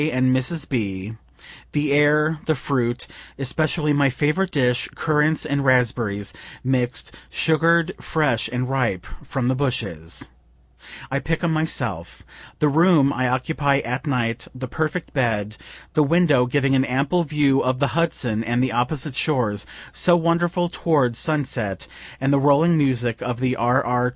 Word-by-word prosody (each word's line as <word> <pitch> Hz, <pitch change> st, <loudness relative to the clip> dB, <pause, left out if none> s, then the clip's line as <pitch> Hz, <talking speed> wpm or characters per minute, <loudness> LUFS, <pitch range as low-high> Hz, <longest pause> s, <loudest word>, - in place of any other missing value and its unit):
and 130 Hz, -2 st, +2 dB
Mrs. 145 Hz, +4 st, -1 dB
B., 105 Hz, -4 st, -3 dB, 0.6 s
the 145 Hz, -1 st, 0 dB
air, 150 Hz, +2 st, +3 dB
the 155 Hz, -, +2 dB
fruit, 125 Hz, -3 st, -2 dB, 0.3 s
(especially 150 Hz, +3 st, 0 dB
my 140 Hz, -1 st, +3 dB
favorite 155 Hz, +8 st, 0 dB
dish, 125 Hz, -5 st, +1 dB
currants 155 Hz, 0 st, +1 dB
and 140 Hz, -2 st, -1 dB
raspberries, 115 Hz, -6 st, +1 dB, 0.3 s
mixed, 125 Hz, -2 st, -1 dB, 0.2 s
sugar'd, 165 Hz, +2 st, +2 dB
fresh 150 Hz, -8 st, 0 dB
and 125 Hz, +1 st, -2 dB
ripe 125 Hz, -9 st, -1 dB, 0.2 s
from 130 Hz, -3 st, -2 dB
the 130 Hz, -, +2 dB
bushes 110 Hz, -, -3 dB, 0.8 s
I 140 Hz, -, 0 dB
pick 165 Hz, +5 st, -3 dB
'em 165 Hz, -2 st, +1 dB
myself) 120 Hz, -, -2 dB, 0.3 s
the 150 Hz, -, +2 dB
room 150 Hz, -2 st, +4 dB
I 130 Hz, +1 st, 0 dB
occupy 140 Hz, +2 st, 0 dB
at 125 Hz, +5 st, -4 dB
night, 120 Hz, -4 st, -1 dB
the 130 Hz, 0 st, -5 dB
perfect 155 Hz, +6 st, -3 dB
bed, 110 Hz, -5 st, -1 dB, 0.4 s
the 155 Hz, -, +3 dB
window 150 Hz, -4 st, +3 dB
giving 135 Hz, +1 st, +1 dB
an 130 Hz, -1 st, +3 dB
ample 140 Hz, +7 st, 0 dB
view 145 Hz, -3 st, +2 dB
of 130 Hz, 0 st, 0 dB
the 140 Hz, +1 st, +1 dB
Hudson 130 Hz, -10 st, 0 dB
and 120 Hz, +2 st, 0 dB
the 130 Hz, -, 0 dB
opposite 125 Hz, +4 st, -1 dB
shores, 120 Hz, -10 st, -1 dB, 0.3 s
so 175 Hz, -1 st, +4 dB
wonderful 170 Hz, +1 st, +1 dB
toward 145 Hz, -8 st, +1 dB
sunset, 125 Hz, -, -2 dB, 0.3 s
and 135 Hz, +1 st, +1 dB
the 140 Hz, -, +4 dB
rolling 145 Hz, +5 st, +4 dB
music 125 Hz, -6 st, 0 dB
of 125 Hz, -1 st, -3 dB
the 130 Hz, 0 st, 0 dB
RR. 125 Hz, +1 st, +2 dB
135 Hz, 145 wpm, -22 LUFS, 125-155 Hz, 0.8 s, room